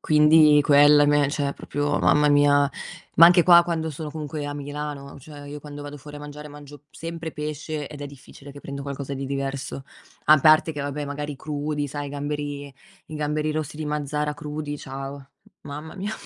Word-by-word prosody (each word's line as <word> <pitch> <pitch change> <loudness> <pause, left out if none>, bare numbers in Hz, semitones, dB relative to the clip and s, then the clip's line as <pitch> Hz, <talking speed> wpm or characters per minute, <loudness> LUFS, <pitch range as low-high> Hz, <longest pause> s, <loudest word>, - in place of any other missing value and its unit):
Quindi 150 -1 +6
quella 145 0 +6
a - - +2
me 145 -1 +3
cioè 145 -2 -1
proprio 145 0 -2
mamma 150 0 +4
mia, 145 0 +4 0.5
ma 170 - +10
anche 175 0 +6
qua 170 0 +7
quando 165 -2 -2
sono 150 +1 -6
comunque 150 -1 -5
a 145 - -4
Milano, 145 -1 -6
cioè 145 +1 -12
io 145 0 -8
quando 145 0 -9
vado 145 0 -8
fuori 145 +1 -11
a - - -8
mangiare 150 0 -9
mangio 145 0 -12
m - - -25
sempre 165 -1 -7
pesce, 150 0 -5
ed 145 - -10
è 145 - -5
difficile 140 0 -13
che 145 - -11
prendo 140 0 -7
qualcosa 140 0 -5
di 135 0 -5
diverso. 135 0 -4 0.4
A 155 0 +7
parte 155 +2 +5
che 145 - -5
vabbè, 145 +1 -3
magari, 145 0 -5
crudi, 150 +1 -3
sai 145 +1 -5
i - - -6
gamberi, 145 0 -5 0.3
i 155 - -9
gamberi 150 0 -1
rossi 150 -1 -4
di 155 - -4
Mazara 150 0 -2
crudi, 150 0 -5
ciao, 135 +1 -8 0.3
mamma 150 +3 -8
mia, 200 +3 -4
145 Hz, 195 wpm, -24 LUFS, 145-150 Hz, 0.5 s, ma